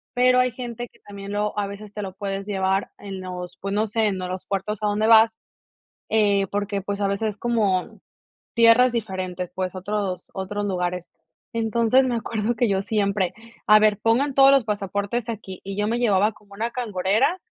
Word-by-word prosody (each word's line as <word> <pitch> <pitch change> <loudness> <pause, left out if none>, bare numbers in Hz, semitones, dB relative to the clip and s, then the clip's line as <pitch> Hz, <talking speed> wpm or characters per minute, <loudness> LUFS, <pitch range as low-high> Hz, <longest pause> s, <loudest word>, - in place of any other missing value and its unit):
Pero, 250 0 +4
hay 250 0 +3
gente 240 0 -6
que - - -25
también, 200 0 -8
lo 210 0 -1
a 200 - -1
veces, 200 +1 -9
te 210 - -5
lo 190 -2 -6
puedes 195 0 -4
llevar 195 0 0
en 195 -2 -7
los 180 -1 -7
pues, 195 +1 -4
no 215 +2 +2
sé, 220 0 +1
en 195 -2 -1
los 185 0 -5
puertos 200 +1 -2
a 210 - +1
donde 210 +1 +1
vas, 225 0 +7 0.8
eh, 205 -3 +3
porque, 205 -1 -2
pues 200 +1 -4
a 200 - +1
veces, 200 +2 -1
es 200 - -8
como 210 -6 0 0.5
tierras 235 +2 +6
diferentes 185 -5 -3
pues, 185 0 -3
otros 190 -1 -3
otros 205 +2 -3
lugares. 180 -2 -2 0.5
Entonces, 230 +3 +3
me 245 -2 0
acuerdo, 230 0 -2
que 230 -1 +1
yo 195 -1 +1
siempre: 200 -3 0 0.3
"A 215 0 +8
ver, 210 -1 +3
pongan 260 +5 +2
todos 275 0 +7
los 275 -3 +5
pasaportes 205 +2 -2
aquí". 200 -4 -6
Y 195 0 -6
yo 210 0 0
me 235 +2 0
llevaba 210 -2 +3
como 200 -1 -20
una 230 +4 -3
cangurera, 220 - +1
205 Hz, 190 wpm, -23 LUFS, 195-225 Hz, 0.8 s, A